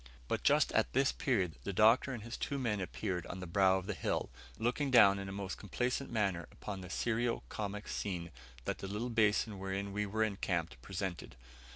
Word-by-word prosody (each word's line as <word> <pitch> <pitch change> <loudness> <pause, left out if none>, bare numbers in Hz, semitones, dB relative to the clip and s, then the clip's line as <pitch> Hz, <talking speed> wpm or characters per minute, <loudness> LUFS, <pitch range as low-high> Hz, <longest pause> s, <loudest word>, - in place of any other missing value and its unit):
But - - -1
just - - +4
at - - +2
this 135 +1 +4
period 95 - 0
the 100 - -2
Doctor 115 +7 +5
and 120 -5 -5
his 120 +2 -5
two 140 - -2
men 110 -7 0
appeared 95 -1 -3
on 95 - -6
the 90 - -5
brow 95 +2 +4
of 95 - -4
the 105 - -2
hill, 80 - -1 0.3
looking 125 - 0
down 100 -6 +7
in 100 0 -5
a - - -5
most 100 -1 -4
complacent 125 +7 -1
manner 100 -7 0
upon 100 -2 -6
the 90 - -8
serio 120 +4 0
comic 105 0 -4
scene 90 -4 -3 0.3
that - - -2
the 95 - -5
little 110 +5 -3
basin 105 -2 +2
wherein 95 +1 -3
we 105 0 -1
were 110 +2 +1
encamped 85 - -2
presented. 95 +1 -4
100 Hz, 200 wpm, -34 LUFS, 95-115 Hz, 0.3 s, down